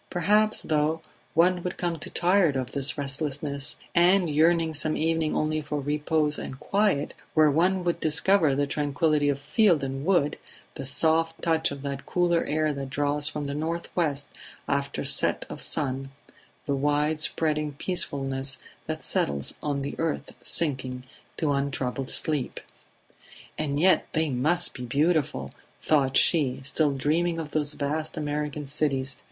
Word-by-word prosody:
Perhaps, 210 +5 +2
though, 155 +1 +1 0.4
one 175 +2 +3
would 180 +1 -4
come 170 -2 -2
to - - -6
tire 180 0 +3
of 130 -3 -3
this 140 +1 +2
restlessness, 140 0 -3 0.2
and, 175 0 +4
yearning 165 +1 +3
some 155 +1 -1
evening 160 0 0
only 155 0 0
for 150 0 -3
repose 150 +1 0
and 130 - -7
quiet, 195 -5 +1 0.2
where 155 -2 +5
would 180 +4 +1
one 175 - +1
discover 160 -1 +2
the 145 +1 +1
tranquillity 145 +1 +1
of 140 - 0
field 175 - +2
and 135 0 -4
wood, 165 -4 +1 0.3
the 135 - -6
soft 165 +4 +2
touch 160 -1 +2
of 140 -1 -8
that 140 -1 -5
cooler 175 -1 +2
air 155 0 0
that 135 -1 -5
draws 145 +2 0
from 150 -1 -3
the 140 0 -3
north 165 +3 -4
west 145 -5 0 0.4
after 140 0 -1
set - - +4
of - - -7
sun, 135 -2 -1 0.6
the 140 - -1
wide 150 +2 0
spreading 150 -1 0
peacefulness 135 -5 0 0.3
that - - -4
settles 70 -1 0
on 140 -2 -2
the 140 - -4
earth 165 -1 -2
sinking 130 -5 -1 0.3
to 155 -3 0
untroubled 135 -1 -2
sleep. 150 -5 -1 1.0
"And 145 -2 -2
yet 185 +3 +4
they 160 -2 0
must 160 +8 +2
be 125 - -7
beautiful!" 140 - 0 0.3
thought 135 -4 +2
she, 140 -7 +3
still 145 +1 0
dreaming 165 +5 0
of 155 -2 -5
those 150 -1 0
vast 155 +3 -3
American 150 -1 -3
cities 135 -2 -1
150 Hz, 150 wpm, -26 LUFS, 140-165 Hz, 1.0 s, where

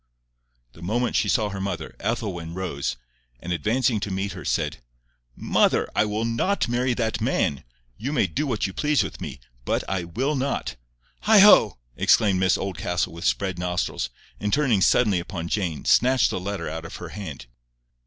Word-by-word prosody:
The - - -15
moment 115 +7 -1
she 105 - +2
saw 105 0 +2
her 95 -1 -5
mother, 100 +1 -4
Ethelwyn 85 -5 -3
rose, 70 -9 -3 0.4
and 90 +6 -3
advancing 110 - +1
to 100 - -4
meet 95 +1 -2
her, 90 0 -8
said, 75 -3 -1 0.5
"Mother, - - +2
I - - +3
will 105 +2 -2
NOT 115 - 0
marry 120 +1 0
that 110 -3 -1
man. 70 - 0 0.3
You 130 +6 -3
may 135 -9 +2
do 140 - -2
what 115 -5 -1
you 95 - -4
please 150 +3 +2
with - - -7
me, - - -6 0.2
but - - 0
I 95 -3 -2
WILL 130 - -1
NOT." 135 - -2 0.5
"Heigho!" 205 - +7 0.2
exclaimed 100 -4 +3
Mrs 95 0 +3
Oldcastle 90 -2 -2
with 85 - -7
spread 95 -3 0
nostrils, 90 -8 -2 0.3
and 105 - -2
turning 125 -8 +2
suddenly 105 -2 +4
upon 85 -1 -5
Jane, 90 -8 -2
snatched 130 +1 +4
the - - -2
letter 95 -2 -4
out 80 +1 -5
of 80 - -8
her 90 - -7
hand. 80 -10 -7
100 Hz, 175 wpm, -24 LUFS, 90-120 Hz, 0.5 s, Heigho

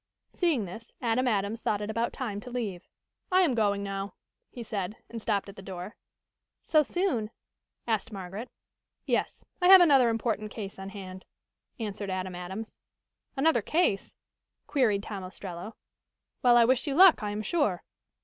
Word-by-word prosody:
Seeing 315 - +1
this, 220 +6 -10
Adam 250 +1 +1
Adams 210 0 0
thought 205 - 0
it 210 +1 -3
about 230 +2 -1
time 215 -6 -4
to 250 - -9
leave. 215 -8 -4 0.4
"I 370 +1 +5
am 305 -8 +2
going 205 -3 +1
now," 195 0 -4 0.3
he 240 - -8
said, 205 -2 -3 0.2
and 230 -1 -6
stopped 205 -2 0
at 200 - -10
the 195 - -10
door. 190 +1 -7 0.7
"So 310 -2 +4
soon?" 300 - -1 0.6
asked 220 -3 -1
Margaret. 195 +4 -6 0.6
"Yes, - - -1 0.2
I 360 - +4
have 380 0 +11
another 275 -8 +6
important 225 -1 -1
case 200 -3 -7
on 190 0 -6
hand," 190 -2 -9 0.6
answered 205 -2 -4
Adam 185 0 -3
Adams. 190 +5 -6 0.6
"Another 320 +4 +3
case?" 310 - 0 0.5
queried 220 -8 +2
Tom 200 -3 -6
Ostrello. 185 +2 -7 0.7
"Well, 240 -1 +6
I 235 - +7
wish 260 +4 +2
you 275 - -1
luck, 365 -4 +8
I 210 - -2
am 210 +1 -3
sure." 215 - 0
215 Hz, 160 wpm, -28 LUFS, 195-250 Hz, 0.7 s, have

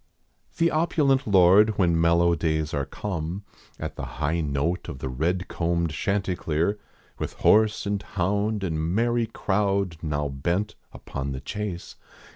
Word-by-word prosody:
The 170 0 +3
opulent 145 -4 +2
lord 100 +2 +5
when 85 -3 +3
mellow 85 +1 +4
days 80 -1 -1
are 70 -2 -1
come, 90 +2 -4 0.4
At - - -5
the - - -4
high 80 +3 0
note 75 +5 -1
of 65 -5 -7
red 80 +8 -1
combed 85 -1 -1
chanticleer, 95 0 -1 0.4
With - - -3
horse 110 0 +3
and 100 0 -1
hound 100 +3 -1
and 80 -4 -1
merrv 115 +7 0
crowd 100 -4 0
now 75 -2 -1
bent 85 +10 -1 0.2
rpon 70 0 -5
the 65 - -5
chase. 95 +4 -5
90 Hz, 135 wpm, -25 LUFS, 80-105 Hz, 0.4 s, lord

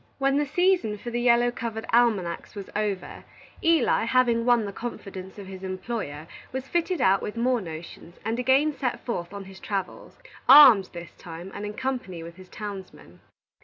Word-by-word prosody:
When 275 0 +2
the 295 0 +1
season 350 - +1
for 240 +3 -7
the 240 0 -1
yellow 240 0 +4
covered 225 -2 -5
almanacs 220 -9 +1
was 200 -2 -8
over, 205 -3 -3 0.4
Eli, 330 -8 +3
having 235 -1 +2
won 240 -3 +3
the 200 - -6
confidence 195 -5 -7
of 200 - -8
his 190 0 -9
employer, 185 -5 -5 0.3
was 265 +1 -5
fitted 345 -1 -1
out 190 +1 +4
with 210 - -5
more 245 0 +1
notions, 165 0 -9
and 225 +2 -1
again 270 +4 +3
set 250 -4 -3
forth 175 -8 -3
on 200 -1 -7
his 190 0 -12
travels, 195 -2 -5 0.3
armed, 260 -9 +9
this 170 -1 -9
time, 170 +2 -9
and 210 - -5
in 210 - -7
company 245 -11 -4
with 170 +1 -11
his 185 -1 -14
townsman. 200 -3 -9
220 Hz, 175 wpm, -26 LUFS, 190-250 Hz, 0.4 s, armed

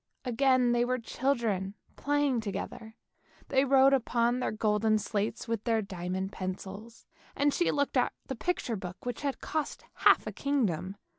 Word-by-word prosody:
Again 255 0 +3
they 240 0 +3
were 255 +1 0
children 225 -6 -1 0.2
playing 290 -4 +1
together: 220 +2 -6 0.5
they 265 -1 +4
wrote 270 0 +5
upon 240 -1 +2
the - - -1
golden 215 0 +2
slates 210 +2 -2
with 225 -2 -2
their 225 -2 +1
diamond 185 0 -4
pencils, 195 +4 -7 0.3
and 285 0 +2
she 350 - +2
looked 285 -1 0
at 250 - +3
the - - -4
picture 250 -4 -1
book 185 0 -8
which 245 -2 -3
had 280 -2 -2
cost 310 -2 -3
half - - +4
a - - -3
kingdom. 205 - -1
235 Hz, 155 wpm, -30 LUFS, 205-265 Hz, 0.5 s, wrote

